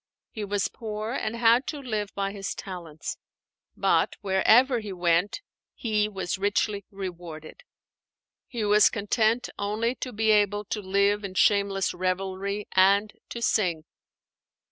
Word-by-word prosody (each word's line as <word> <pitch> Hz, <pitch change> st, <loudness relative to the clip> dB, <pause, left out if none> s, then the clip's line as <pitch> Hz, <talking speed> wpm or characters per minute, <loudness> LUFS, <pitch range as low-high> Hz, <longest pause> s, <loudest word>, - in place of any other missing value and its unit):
He 215 Hz, -, -5 dB
was 205 Hz, 0 st, 0 dB
poor 215 Hz, 0 st, -5 dB
and 230 Hz, -3 st, -2 dB
had 235 Hz, +2 st, +4 dB
to 305 Hz, -, -3 dB
live 215 Hz, -6 st, -3 dB
by 195 Hz, 0 st, -1 dB
his 195 Hz, -1 st, -5 dB
talents. 170 Hz, -5 st, -7 dB, 0.6 s
But -, -, +2 dB
wherever 225 Hz, +6 st, +4 dB
he 210 Hz, -2 st, -7 dB
went 175 Hz, -, +1 dB, 0.3 s
he 215 Hz, -3 st, 0 dB
was 190 Hz, -2 st, -3 dB
richly 205 Hz, 0 st, 0 dB
rewarded. 175 Hz, -, -8 dB, 0.9 s
He 235 Hz, -4 st, -3 dB
was 210 Hz, 0 st, +6 dB
content 220 Hz, +3 st, 0 dB
only 215 Hz, +4 st, 0 dB
to 255 Hz, -, -6 dB
be 220 Hz, -1 st, +2 dB
able 205 Hz, 0 st, +2 dB
to 210 Hz, +1 st, -3 dB
live 200 Hz, +2 st, +1 dB
in 190 Hz, -2 st, -6 dB
shameless 200 Hz, -1 st, +2 dB
revelry 190 Hz, +2 st, -2 dB
and 200 Hz, +2 st, +4 dB, 0.2 s
to 235 Hz, -, -5 dB
sing. 175 Hz, -9 st, +1 dB
205 Hz, 135 wpm, -26 LUFS, 190-215 Hz, 0.9 s, was